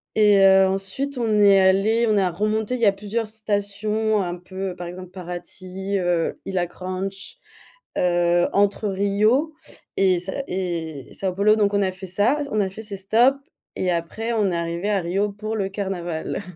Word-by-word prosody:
Et 210 -2 +5
heu, 190 0 +6
ensuite 195 +9 -3
on 220 -3 +1
est 200 -1 +6
allés 200 +5 +3
on 215 - +3
a 185 -2 +2
remonté 215 +6 -1
il 250 - -3
y 230 - +4
a 200 - +6
plusieurs 210 +3 -3
stations 215 0 -1
un 175 -1 -3
peu 185 +1 -6
par 175 -1 -7
exemple 180 +1 -8
Paraty, 185 +2 -5
heu, 175 -2 0
Ilha 185 -2 -1
Granche, 190 - -6 0.6
heu, 175 0 +2
entre 205 +1 +1
Rio 210 +10 +1 0.4
et 185 -2 +3
Sa 190 +2 -5 0.2
et 165 -6 -4
São 190 -2 -3
Paulo 210 +3 +4
donc 205 -1 +2
on 200 - +2
a 190 -1 0
fait 190 +1 -9
ça 205 +10 +1
on 215 - +1
a 195 -2 0
fait 210 +4 -9
ces 210 -2 -6
stops 230 +8 +3 0.4
et 185 - 0
après 175 +8 -3
on 210 -4 +1
est 170 - -1
arrivés 170 +4 -2
à 200 - +2
Rio 190 +4 -1
pour 215 +2 -4
le 195 -2 -1
carnaval. 190 -3 -4
195 Hz, 180 wpm, -23 LUFS, 185-215 Hz, 0.6 s, heu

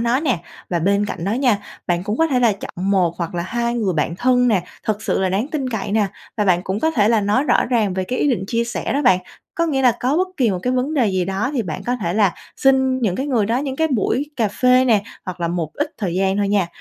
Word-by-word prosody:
nó 235 +3 +1
nè. 260 - 0 0.3
Và 175 - +1
bên 200 +4 +1
cạnh 170 - -5
đó 200 - 0
nha, 245 -3 +2 0.3
bạn 175 0 0
cũng 210 +2 -2
có 325 - +4
thể 265 -5 +1
là 235 -3 +4
chọn 195 -1 -4
1 180 -4 +2
hoặc 170 0 -4
là 170 - -1
2 235 +5 -2
người 215 -6 0
bạn 160 +2 0
thân 250 0 +3
nè, 200 -6 +2 0.2
thật 215 0 -1
sự - - 0
là 190 - +1
đáng 200 +8 -1
tin 290 -4 -2
cậy 210 -4 -3
nè, 215 -1 +2 0.3
và 210 - +1
bạn 180 -3 +3
cũng 190 +3 -3
có 320 - +2
thể 215 -9 +2
là 225 -1 +3
nói 210 +7 +1
rõ - - +3
ràng 220 -6 +1
về 190 0 -1
cái 250 +7 -3
ý 290 - +2
định 215 -7 -1
chia 230 +2 0
sẻ 240 - -3
đó 285 - 0
bạn. 215 -9 +5 0.4
Có 335 -1 +1
nghĩa 275 -4 0
là 250 -2 +5
có 260 +4 +1
bất 370 +2 +1
kỳ 245 -6 +2
một 185 - -1
cái 250 - 0
vấn 255 +4 -1
đề 260 -6 +3
gì 185 -2 0
đó 195 +7 -1
thì 260 -5 0
bạn 175 -6 -5
có 245 +1 -1
thể 180 -7 -2
là 200 -5 +3 0.2
xin 265 -1 +3
những 220 -8 0
cái 270 - -2
người 235 -8 +1
đó 230 +3 +1
những 270 -1 -3
cái 320 +2 +1
buổi 265 +3 0
cà 225 -4 +1
phê 250 +5 +3
nè, 220 -5 +3 0.2
hoặc 185 -2 -6
là 170 - 0
một 170 -2 -2
ít 295 +2 -2
thời 185 -6 -2
gian 190 +1 +1
thôi 205 -1 +1
nha. 200 -3 +2
220 Hz, 290 wpm, -20 LUFS, 190-255 Hz, 0.4 s, bạn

